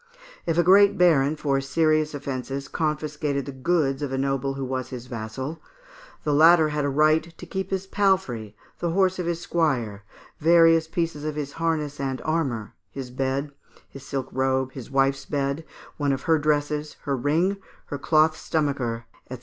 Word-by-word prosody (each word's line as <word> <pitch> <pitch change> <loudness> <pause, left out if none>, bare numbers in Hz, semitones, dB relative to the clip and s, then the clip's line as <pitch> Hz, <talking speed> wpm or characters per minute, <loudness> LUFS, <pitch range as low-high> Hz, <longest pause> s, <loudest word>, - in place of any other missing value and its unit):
If 165 -1 +1
a 175 - +5
great 200 +3 +6
baron 155 -5 +4
for 140 -2 0
serious 155 +2 +1
offences 135 0 -4
confiscated 150 -3 -2
the 140 - -5
goods 135 0 0
of 145 -2 -3
a 135 - -1
noble 135 0 -1
who 135 -1 -3
was 130 -1 -3
his 125 -1 -7
vassal, 125 +6 -6 0.6
the 150 - +1
latter 160 +1 +6
had 150 -1 -1
a 145 - +1
right 155 +3 +4 0.2
to - - -9
keep 190 +2 -4
his 190 0 -2
palfrey, 185 - 0 0.2
the 170 - -1
horse 185 +1 +2
of 175 - -2
his 170 -1 -2
squire, 125 -12 0 0.4
various 165 0 +5
pieces 165 -2 -2
of 155 -1 -3
his 145 -2 -4
harness 155 -3 -2
and 135 -1 -2
armour, 135 -10 -1 0.2
his 130 +2 -7
bed, 135 +2 -2 0.4
his 135 - -12
silk 135 -2 -4
robe, 130 0 0
his 130 -3 -9
wife's 135 0 +1
bed, 140 +1 -1 0.3
one 145 -2 +1
of 135 - -4
her 160 -1 +3
dresses, 150 0 0
her 140 - -1
ring, 160 +9 +1 0.3
her 145 - -5
cloth 155 +2 +3
stomacher, 135 -9 -2 0.3
&c. 130 - -4
145 Hz, 175 wpm, -25 LUFS, 135-160 Hz, 0.6 s, great